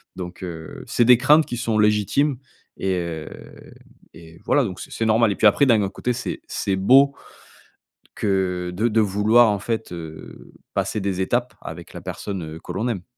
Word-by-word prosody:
Donc, 90 -1 -8
heu, 80 -3 -8
c'est 120 - +2
des 125 0 +7
craintes 150 +5 +5
qui 120 - -5
sont 115 -2 -1
légitimes 105 +7 +2 0.4
et 95 -1 -1
heu, 85 -3 -4 0.8
et 80 0 -14
voilà, 145 - +3
donc 95 -6 -5
c'est - - -9
c'est 115 - -2
normal 110 0 +3
et - - -2
puis - - 0
après, 125 +7 +4
d'un 115 -5 +4
autre 95 0 -4
côté, 125 - -2
c'est 120 - -5
c'est 95 - -2
beau 135 +9 +5 1.0
que 90 -3 -1
de 110 +6 0
de 110 0 +2
vouloir 105 +4 +4
en 105 -1 0
fait, 110 0 -3
heu, 80 -2 -10 0.2
passer 110 - -1
des 95 -2 -2
étapes 120 +6 -1
avec - - -9
la - - -8
personne, 95 -4 -5
heu, 80 +1 -8
que - - -8
l'on 105 +6 -2
aime. 100 -7 -3
105 Hz, 190 wpm, -22 LUFS, 90-120 Hz, 1.0 s, des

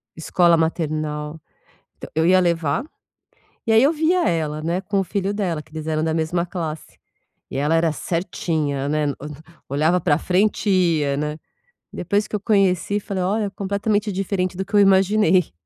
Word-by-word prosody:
escola 170 +1 +3
maternal. 155 -1 -2 0.6
Então, - - -10
eu 160 +1 +2
ia 185 +1 +5
levar 170 - 0 0.8
e 225 - +1
aí 225 +1 +6
eu 285 - +5
via 330 +3 +2
ela, 155 -2 -1
né, 170 +4 -1
com 200 -1 -1
o - - +1
filho 200 +2 -2
dela, 180 -7 -2
que 155 - -23
eles 155 0 -6
eram 155 0 0
da 160 - 0
mesma 165 +2 0
classe, 165 -4 -6 0.5
e - - -5
ela 150 +4 +1
era 165 0 +3
certinha, 155 -5 -2
né, 150 0 0 0.6
olhava 155 +6 +2
pra 160 -3 +2
a 145 - -1
frente 200 +4 +1
ia, 165 -7 +2
né, 150 +1 -2 0.6
depois 205 +4 -1
que 210 - -2
eu - - -5
conheci, 200 -1 +1
falei: 195 -2 -3
"Olha, 210 +4 0
é 200 - -3
completamente 205 +1 -1
diferente 185 -1 -2
do 190 - -2
que 210 - -13
eu 205 - +6
imaginei". 190 - +4
175 Hz, 175 wpm, -21 LUFS, 155-200 Hz, 0.8 s, aí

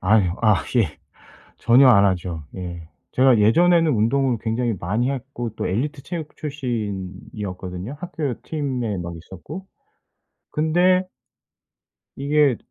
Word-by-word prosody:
아유. 95 -1 +3
아 110 -3 +5 0.2
예. - - +1 0.6
전혀 125 +3 +6
안 100 -5 +7
하죠. 90 -4 -2
예. 85 -3 -7 0.2
제가 130 -2 +5
예전에는 165 +9 +4
운동을 120 +2 +2
굉장히 115 +1 -1
많이 110 +9 0
했고 130 -3 -4
또 - - -2
엘리트 135 +9 -2
체육 165 -4 -6
출신이었거든요 100 - -5
학교 155 -8 -4
팀에 130 - -2
막 85 -1 -5
있었고. 95 - -9 0.8
근데 180 +4 +3 1.1
이게 140 -2 +3
120 Hz, 240 characters per minute, -22 LUFS, 95-145 Hz, 1.1 s, 안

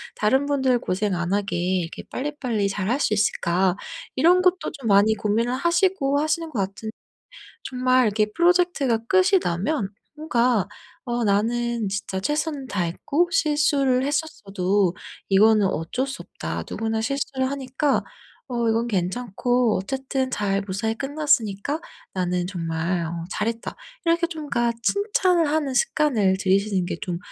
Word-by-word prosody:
다른 265 +7 +2
분들 265 -4 +2
고생 195 -1 -1
안 175 +1 -2
하게 200 -3 -1
이렇게 175 -1 -2
빨리빨리 255 -7 -2
잘 195 +1 -2
할 265 +4 +1
수 215 - +1
있을까?' 190 -3 +1 0.4
이런 345 +7 +5
것도 365 0 +1
좀 235 - -5
많이 205 +2 +5
고민을 225 +4 0
하시고 340 -1 +2
하시는 315 +2 -1
것 240 -9 -4
같은 195 +3 -3 0.7
정말 255 -1 +2
이렇게 215 0 +2
프로젝트가 345 -8 +2
끝이 375 - +4
나면 195 - -1 0.3
뭔가 245 - +1 0.4
'어 240 -2 -1
나는 230 +2 0
진짜 195 -1 -3
최선을 295 +3 -2
다했고 205 - 0
실수를 295 -7 +2
했었어도 200 - 0 0.3
이거는 210 +1 +5
어쩔 190 - -2
수 270 - -6
없다. - - -5
누구나 225 0 -2
실수를 265 +2 -1
하니까 275 +1 0 0.5
어 235 -2 0
이건 230 +1 +1
괜찮고 235 +4 0
어쨌든 265 +5 -2
잘 200 -3 0
무사히 210 +4 -2
끝났으니까 285 -1 0 0.3
나는 180 -1 -1
정말 170 -1 -2
어 165 0 -5
잘했다.' 230 +1 -3 0.3
이렇게 335 +1 +2
좀 315 -4 -7
그러니까 235 -1 +1
칭찬을 370 - +2
하는 295 -3 0
습관을 235 -9 +2
들이시는 195 0 +1
게 175 - -3
좀 180 -5 -3
235 Hz, 305 characters per minute, -23 LUFS, 195-285 Hz, 0.7 s, 이런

